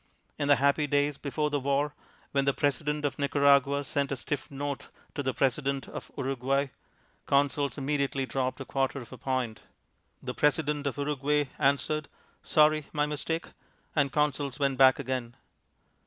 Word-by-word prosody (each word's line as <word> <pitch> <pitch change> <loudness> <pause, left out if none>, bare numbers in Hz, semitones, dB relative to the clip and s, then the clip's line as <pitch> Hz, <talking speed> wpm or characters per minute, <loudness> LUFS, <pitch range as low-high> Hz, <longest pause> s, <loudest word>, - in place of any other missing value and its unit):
In 145 - 0
the 145 - +7
happy 140 +3 +2
days 145 0 +1
before 150 +1 -1
the 145 - +1
war, 140 +2 0 0.4
when 140 -1 +1
the 140 - +2
President 150 +1 0
of 145 - -2
Nicaragua 140 0 +4
sent 140 0 -1
a - - +1
stiff 140 +2 -4
note 140 0 -4 0.3
to - - -2
the 130 -1 0
President 135 0 0
of - - -8
Uruguay, 135 +1 0 0.6
Consols 140 0 +2
immediately 140 -1 0
dropped 130 +1 -2
a 135 - -5
quarter 135 +1 -1
of 120 0 -10
a - - -8
point. 125 -5 -2 0.6
The - - -3
President 150 -1 +1
of 140 - -3
Uruguay 145 0 0
answered, 145 +2 +1 0.3
"Sorry, 155 -1 +3
my 150 -1 +1
mistake," 155 +3 -3 0.5
and 140 -3 +2
Consols 145 -2 0
went 140 -2 0
back 130 -1 +7
again. 125 -3 -3
140 Hz, 155 wpm, -29 LUFS, 135-145 Hz, 0.6 s, the